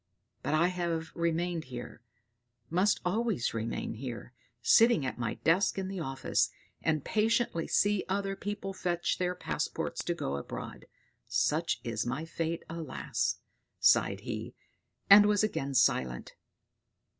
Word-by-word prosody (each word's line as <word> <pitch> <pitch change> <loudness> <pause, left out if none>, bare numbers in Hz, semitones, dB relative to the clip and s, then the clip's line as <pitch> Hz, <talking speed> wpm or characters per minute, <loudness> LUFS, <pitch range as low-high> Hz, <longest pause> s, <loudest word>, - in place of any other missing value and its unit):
But 155 - 0
I 170 +3 +4
have 170 -2 -2
remained 170 0 -1
here 120 -2 -8 0.7
must 185 +5 +3
always 210 - 0
remain 115 0 -3
here, 120 +1 -7 0.3
sitting 230 - +5
at 125 - -4
my 115 -2 -2
desk 180 +6 +2
in 190 -1 -2
the 195 -1 -4
office, 135 -4 0 0.3
and 155 -3 0
patiently 225 -5 +1
see 205 -1 +2
other 195 0 -1
people 200 -1 -4
fetch 175 -2 -1
their 180 0 0
passports - - -3
to - - 0
go 70 +1 -2
abroad. 70 - -7 0.4
Such 155 -4 +1
is 115 -2 -2
my 135 +7 -3
fate! 165 0 -3
Alas!" 120 - -2 0.4
sighed - - +4
he, - - -5 0.5
and 205 +1 +9
was 210 0 +3
again 140 -10 -1
silent. 65 - +2
165 Hz, 135 wpm, -31 LUFS, 130-195 Hz, 0.7 s, and